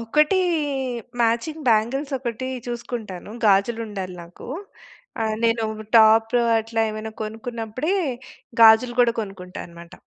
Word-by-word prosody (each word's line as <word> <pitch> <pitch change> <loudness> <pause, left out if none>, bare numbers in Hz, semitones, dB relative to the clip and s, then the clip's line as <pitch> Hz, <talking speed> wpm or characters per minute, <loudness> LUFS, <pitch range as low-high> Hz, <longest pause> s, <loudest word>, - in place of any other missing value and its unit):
ఒకటి 300 - +2 0.8
matching 240 +7 0
bangles 240 +6 +1
ఒకటి 250 0 -4 0.2
చూసుకుంటాను. 235 -6 -6
గాజులు 210 +3 +3
ఉండాలి 190 -3 -6
నాకు. 170 +1 -13 0.8
ఆహ్, 220 -1 0
నేను 230 0 +2 0.3
టాప్ 225 +1 +5 0.3
అట్లా 225 0 -1
ఏమైనా 215 +1 -6
కొనుక్కున్నప్పుడే 225 - -3 0.7
గాజులు 225 +2 +7
కూడా 240 -1 +4
కొనుక్కుంటా 190 -3 -8
అన్నమాట. 170 0 -14
225 Hz, 105 wpm, -23 LUFS, 215-240 Hz, 0.8 s, గాజులు